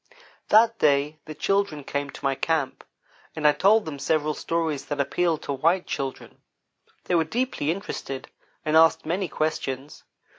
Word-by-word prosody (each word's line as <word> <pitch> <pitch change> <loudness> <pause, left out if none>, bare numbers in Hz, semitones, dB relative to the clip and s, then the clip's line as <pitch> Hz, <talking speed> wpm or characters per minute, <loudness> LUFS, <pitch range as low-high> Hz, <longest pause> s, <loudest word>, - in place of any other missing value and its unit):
That 225 +1 +5
day 145 +1 +2
the 155 - -8
children 195 -4 0
came 140 +1 -3
to - - -9
my 135 - +3
camp, 145 -1 -1 0.5
and 155 -1 +2
I - - +7
told 200 +9 +4
them 150 -3 -6
several 155 +1 +1
stories 160 -2 -2
that 145 -1 -4
appeal 165 +4 +1
to 140 - -4
white 165 +7 +2
children. 135 -1 -5 0.6
They - - -2
were 165 -2 +4
deeply 230 - -2
interested, 160 -6 -4 0.4
and 155 0 +1
asked 160 0 +5
many 180 +4 -1
questions. 145 -3 -3
155 Hz, 155 wpm, -25 LUFS, 145-175 Hz, 0.6 s, I